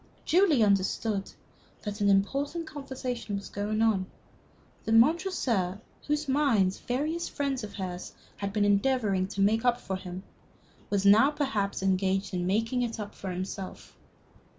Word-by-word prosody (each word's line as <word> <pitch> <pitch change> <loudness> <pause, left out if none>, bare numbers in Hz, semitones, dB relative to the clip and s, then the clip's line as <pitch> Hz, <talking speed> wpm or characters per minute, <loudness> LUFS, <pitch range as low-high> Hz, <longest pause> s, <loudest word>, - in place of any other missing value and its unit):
Julie 330 - +4
understood 200 0 +1 0.5
that 210 0 -5
an 200 - +4
important 275 - +1
conversation 255 -7 -5
was 200 - -6
going 215 +2 -1
on 200 -4 +2 0.8
that 220 - 0
Montresor, 230 - +2 0.3
whose 295 0 0
mind 250 -10 +3
various 305 +7 -1
friends 275 -3 -2
of 205 -1 -7
hers 185 -3 -6 0.2
had 200 0 -3
been 205 0 +1
endeavoring 205 -2 +2
to 200 0 -3
make 220 +3 +3
up 245 -1 +2
for 190 - -4
him, 185 0 -7 0.7
was 200 -1 0
now 215 +7 +7
perhaps 220 -11 -1
engaged 190 0 +1
in 180 -1 -1
making 225 +6 +1
it 230 -2 -2
up 205 -1 -6
for 195 - -7
himself. 185 +1 -6
210 Hz, 145 wpm, -28 LUFS, 195-265 Hz, 0.8 s, now